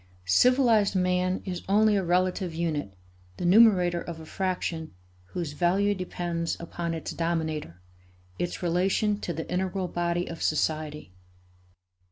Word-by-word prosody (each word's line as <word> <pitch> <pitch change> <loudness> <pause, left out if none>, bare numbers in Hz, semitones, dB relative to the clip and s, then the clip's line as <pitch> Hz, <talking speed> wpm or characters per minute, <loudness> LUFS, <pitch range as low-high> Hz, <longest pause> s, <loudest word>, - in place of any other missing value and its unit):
Civilized 225 - +4
man 180 0 +1
is 180 -2 -4
only 210 +1 +4
a 195 - +1
relative 180 0 0
unit, 150 - -2 0.4
the - - -3
numerator 180 -3 +5
of 165 -1 -7
a 160 - -10
fraction 170 - -3 0.3
whose 160 - -5
value 190 +5 +2
depends 175 -3 -3
upon 170 0 -4
its 160 - -5
dominator, 160 - -2 0.6
its 175 +1 -3
relation 190 +4 +1
to 175 - -4
the 160 0 -5
integral 185 0 -1
body 175 0 -1
of 165 - -7
society. 155 - -1
175 Hz, 130 wpm, -27 LUFS, 165-190 Hz, 0.6 s, numerator